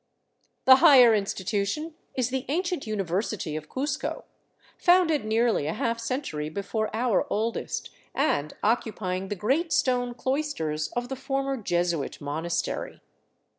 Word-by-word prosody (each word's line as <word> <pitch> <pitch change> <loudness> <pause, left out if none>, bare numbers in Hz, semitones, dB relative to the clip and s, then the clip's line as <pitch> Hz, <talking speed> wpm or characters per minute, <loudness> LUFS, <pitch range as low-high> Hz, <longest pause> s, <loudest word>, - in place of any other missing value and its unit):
The 260 0 +9
higher 265 -7 +8
institution 205 - -1 0.2
is 250 -1 0
the 265 -1 -1
ancient 345 -2 -1
University 195 -4 -2
of 155 0 -6
Cuzco, 280 +3 -3 0.5
founded 350 - +3
nearly 220 -7 +2
a 160 - -1
half 230 +1 -1
century 230 - -3
before 205 +5 -2
our 230 -1 +1
oldest, 225 +2 -2 0.2
and 150 - 0
occupying 200 -4 -1
the 205 - -3
great 275 - 0
stone 245 -2 +1
cloisters 235 - -1
of 245 0 -2
the 265 - -3
former 270 +1 -2
Jesuit 175 - -1
monastery. 155 +4 -3
230 Hz, 125 wpm, -26 LUFS, 185-265 Hz, 0.5 s, The